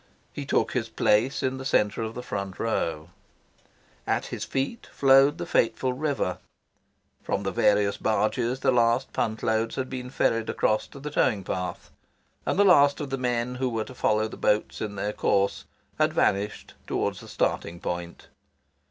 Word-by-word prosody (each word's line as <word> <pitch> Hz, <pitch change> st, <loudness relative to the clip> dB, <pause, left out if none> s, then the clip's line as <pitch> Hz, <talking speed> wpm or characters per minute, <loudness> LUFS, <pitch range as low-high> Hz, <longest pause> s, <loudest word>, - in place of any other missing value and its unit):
He 140 Hz, -1 st, -6 dB
took -, -, +1 dB
his 115 Hz, -3 st, -2 dB
place 110 Hz, +4 st, +2 dB
in 130 Hz, 0 st, -1 dB
the -, -, -6 dB
centre 105 Hz, -5 st, +1 dB
of 110 Hz, 0 st, -4 dB
the 125 Hz, -, -6 dB
front 100 Hz, -5 st, -4 dB
row. 85 Hz, -7 st, -2 dB, 1.0 s
At -, -, 0 dB
his -, -, -5 dB
feet 135 Hz, +13 st, -3 dB
flowed 135 Hz, +2 st, +5 dB
the 175 Hz, -, -4 dB
fateful 130 Hz, -4 st, +1 dB
river. 135 Hz, -9 st, -1 dB, 0.8 s
From 100 Hz, -, -2 dB
the 95 Hz, -, -1 dB
various 100 Hz, +2 st, +2 dB
barges 120 Hz, +4 st, 0 dB
the 130 Hz, -, +3 dB
last 120 Hz, +1 st, +2 dB
punt 110 Hz, 0 st, -2 dB
loads 110 Hz, +1 st, 0 dB
had 130 Hz, -1 st, -3 dB
been 125 Hz, -1 st, -5 dB
ferried 115 Hz, -3 st, 0 dB
across 110 Hz, 0 st, +1 dB
to 140 Hz, -, -12 dB
the 150 Hz, +2 st, -6 dB
towing 110 Hz, -8 st, +1 dB
path, 90 Hz, -1 st, -4 dB, 0.6 s
and -, -, +1 dB
the 205 Hz, -, +6 dB
last 145 Hz, -6 st, +6 dB
of 145 Hz, -3 st, -5 dB
the 135 Hz, -, -1 dB
men 125 Hz, -1 st, -1 dB
who 130 Hz, 0 st, -1 dB
were 115 Hz, -2 st, -2 dB
to -, -, -10 dB
follow 110 Hz, -3 st, +1 dB
the -, -, -10 dB
boats 105 Hz, -, 0 dB
in 105 Hz, -2 st, -4 dB
their 105 Hz, +1 st, -2 dB
course 100 Hz, -1 st, +1 dB, 0.3 s
had -, -, +3 dB
vanished 100 Hz, +2 st, 0 dB
towards -, -, -1 dB
the -, -, -12 dB
starting 85 Hz, +1 st, -1 dB
point. 85 Hz, 0 st, -5 dB
115 Hz, 175 wpm, -26 LUFS, 105-130 Hz, 1.0 s, the